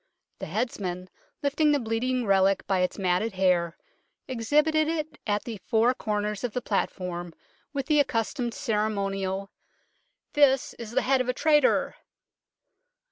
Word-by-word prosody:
The - - -5
heads 245 -3 -2
man, 180 -1 -5 0.3
lifting 295 +1 +3
the 290 - +2
bleeding 240 +2 -1
relic 195 -1 +3
by 190 -1 +1
its 180 0 0
matted 190 +3 0
hair, 180 -3 +1 0.5
exhibited 300 +6 +2
it 315 -2 -3
at 205 0 0
the 230 -3 -6
four 230 +4 +2
corners 210 -2 -2
of 245 -4 -2
the - - 0
platform 175 -4 -3 0.4
with 275 -2 -3
the 300 0 +3
accustomed 240 -1 0
ceremonial 200 -6 -1 0.4
" - - -47
This 275 -3 +3
is 230 -2 -6
the 235 - 0
head 265 0 +3
of 255 - -3
a - - +2
traitor 295 0 +3
225 Hz, 145 wpm, -27 LUFS, 195-270 Hz, 0.5 s, lifting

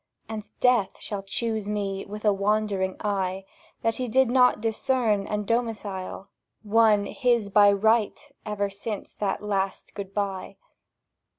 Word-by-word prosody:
And 220 -1 -6
Death 245 -6 +3
shall 205 -2 -4
choose 215 +1 -3
me 200 -2 -2
with 210 +2 -7
a 210 - +5
wondering 200 -2 0
eye 190 -2 -1 0.4
That 225 -1 +1
he 255 - -2
did 260 +1 +3
not 250 -3 +5
discern 220 -2 0
and 210 -1 -2
domicile 210 -5 -3 0.4
One 215 -1 +4
his 240 -5 +1
by 205 0 +7
right 220 +2 +2 0.2
ever 205 -2 -2
since 200 +1 -6
that 200 0 -2
last 195 -2 -2
Good 195 -1 -6
bye! 195 -1 -3
210 Hz, 135 wpm, -26 LUFS, 195-225 Hz, 0.4 s, by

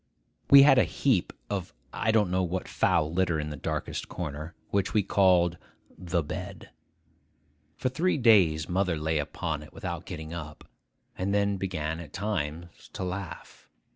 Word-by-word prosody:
We 140 0 +10
had 135 -2 +7
a - - +6
heap 125 -11 +1 0.2
of 95 -3 -4 0.2
I 110 - -1
don't 105 -4 +3
know 95 +1 +2
what 90 +1 -2
foul 75 +1 +1
litter 85 -3 +1
in 75 0 -4
the - - -5
darkest - - -4
corner, 80 -1 -6 0.2
which 100 0 0
we 105 - +4
called 90 -3 +3 0.4
'the 85 -2 -1
bed.' 75 - -7 1.1
For 130 - -1
three 165 +8 +1
days 95 - +4
mother 90 -2 0
lay 80 0 0
upon 75 +1 -3
it 75 - -13
without 85 -2 -6
getting 80 -3 -7
up, 75 -3 -8 0.5
and 100 +2 -1
then 100 -1 +1
began 80 -4 -3
at 85 - -10
times 85 -4 -4
to - - -4
laugh. 90 0 -7
90 Hz, 160 wpm, -28 LUFS, 80-100 Hz, 1.1 s, We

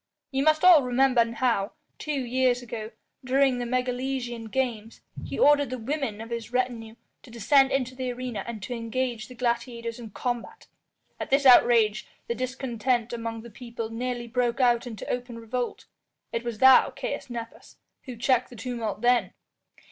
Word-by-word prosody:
Ye 270 0 0
must 310 +2 +3
all 350 -5 +9
remember 250 -2 +2
how, 230 -4 0 0.3
two 295 -3 -2
years 250 0 +1
ago, 220 -2 -6 0.3
during 260 0 +2
the 245 - -3
Megalesian 250 -2 -2
games 230 -3 -3 0.2
he - - -5
ordered 285 -2 +4
the 255 - -4
women 245 -3 -3
of 225 +1 -9
his 235 0 -5
retinue 240 -3 -2 0.3
to 260 - -16
descend 265 +4 +3
into 255 -2 -1
the 255 -1 -3
arena 245 -5 -5
and 220 -4 -6
to 245 - -4
engage 235 -1 -3
the 250 - -12
gladiators 235 -1 -2
in 230 -2 -8
combat. 245 - -4 0.5
At - - -5
this 275 +1 +2
outrage 240 -3 +5 0.2
the - - -1
discontent 250 -2 -2
among 230 -1 -5
the 235 - -11
people 235 -1 -7
nearly 245 +1 -3
broke 240 0 -1
out 245 -1 +3
into 220 -4 -7
open 245 -1 -4
revolt. 240 +2 -4 0.5
It 230 - -3
was 235 -2 -4
thou, 260 +3 +7
Caius 275 +1 -5
Nepos, 230 -1 -8 0.3
who 255 - -7
checked 255 +1 +1
the 245 - -12
tumult 230 -4 -4
then." 245 0 +2
245 Hz, 165 wpm, -26 LUFS, 230-255 Hz, 0.5 s, all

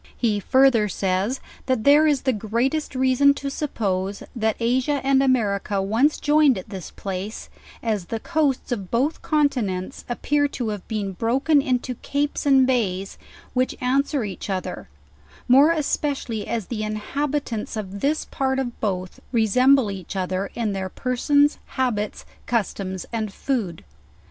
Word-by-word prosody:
He 215 -4 +1
further 255 -2 +4
says, 195 +7 -1 0.3
that 255 -4 +1
there 295 +4 +6
is 290 -3 +1
the 260 - +2
greatest 240 +8 -1
reason 260 +2 +4
to 280 -1 -4
suppose, 200 -9 -2
that 220 -2 +1
Asia 255 +5 +1
and 270 0 +4
America 210 -6 +1
once 225 +10 +2
joined' 295 -4 +4
at 185 - -8
this 190 -4 -7
place, 195 +2 -6 0.3
as 215 -6 -1
the 225 +5 -4
coasts 295 -3 0
of 200 -6 -3
both 265 +7 0
continents 260 - 0
appear 290 +4 +1
to 245 -5 -4
have 210 -3 -5
been 210 -3 -2
broken 265 - +2
into 255 -1 -1
capes 285 +4 -2
and 270 -2 +6
bays, 200 -7 -1 0.3
which 255 0 0
answer 275 +1 +1
each 200 0 -6
other: 185 - -4 0.6
more 275 +5 +7
especially 285 -8 -1
as 230 -4 -2
the 220 0 -4
inhabitants 225 +2 -3
of' 200 -1 -5
this 295 +7 0
part 265 -1 -1
of 260 -2 -1
Loth 185 -3 -2
resemble 250 +1 +4
each 190 0 -7
other 185 +1 -2
in 230 -3 -1
their 190 -1 -3
persons, 285 +6 +2 0.2
habit?, 225 -5 -1 0.2
customs 195 -5 -2
and 220 -3 -2
food. 210 -8 -3
240 Hz, 145 wpm, -23 LUFS, 205-275 Hz, 0.6 s, more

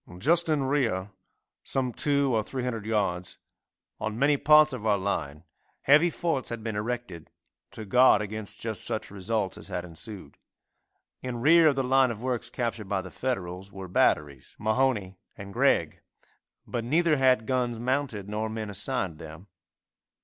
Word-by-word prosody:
Just 165 - +2
in 150 -3 +2
rear, 120 -9 0 0.5
some 130 -2 -1
two 140 -2 +2
or 110 - +2
three 130 +4 -5
hundred 115 -4 -4
yards, 95 -5 -1 0.6
on 110 0 -3
many 140 +3 +3
parts 150 +1 +5
of 125 -4 -6
our 105 -1 +3
line, 80 -6 -3 0.4
heavy 150 +5 +5
forts 160 -6 -2
had 115 -2 -6
been 110 -2 -3
erected 105 -6 -4 0.4
to 110 - -8
guard 125 +1 +5
against 105 0 -5
just 110 -2 -4
such 110 - -2
results 100 0 -2
as - - -9
had 90 0 -4
ensued. 90 +4 -9 0.8
In 125 -2 -4
rear 160 +6 +6
of 145 - +3
the 135 - 0
line 130 0 +4
of 115 0 -6
works 125 -2 -2
captured 115 -4 -4
by 100 -2 0
the 95 - -10
Federals 95 -6 -4
were 95 -2 -8
batteries 75 -6 0
Mahone 110 -4 0 0.2
and 100 0 -9
Gregg, - - +1 0.6
but 120 - -3
neither 155 +5 +2
had 130 -4 +3
guns 125 -2 -1
mounted 125 -5 -2
nor 105 +1 -3
men 110 -1 -5
assigned 100 -5 -3
them. 80 +4 -11
110 Hz, 160 wpm, -27 LUFS, 100-130 Hz, 0.8 s, rear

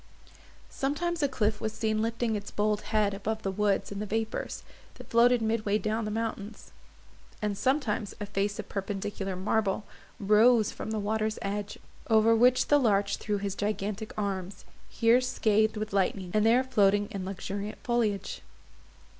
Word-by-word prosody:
Sometimes 330 +5 -1
a 285 - +3
cliff 215 -5 -1
was 220 - -2
seen 220 -1 0
lifting 230 0 -1
its 205 -1 -5
bold 210 0 0
head 210 -2 +2
above 215 +2 -3
the 195 - -1
woods 205 +1 0
and 200 0 -4
the 210 - -4
vapours, 220 +1 -3 0.3
that - - -13
floated 235 0 +4
mid 220 0 0
way 205 0 +2
down 215 +2 -2
the - - -2
mountains; 220 -1 -5 0.7
and 210 -1 -1
sometimes 250 -4 0
a 205 - -3
face 205 0 -1
of - - -6
perpendicular 195 -1 -4
marble 200 +2 0 0.4
rose 215 +2 +4
from - - -6
the 220 - -2
water's 215 +1 -1
edge, 205 +1 -3 0.3
over 225 0 +5
which 250 +2 +4
the 290 - +6
larch 200 -5 +2
threw 210 -1 -2
his 200 -1 -3
gigantic 210 +1 -3
arms, 195 -2 -4 0.2
here 230 +2 +4
scathed 220 -4 +1
with 215 -1 -4
lightning, 190 -2 0
and 215 +1 +3
there 245 +3 +5
floating 205 -5 +3
in 195 -2 -4
luxuriant 200 +2 -5
foliage. 215 -5 -1
215 Hz, 165 wpm, -29 LUFS, 200-225 Hz, 0.7 s, the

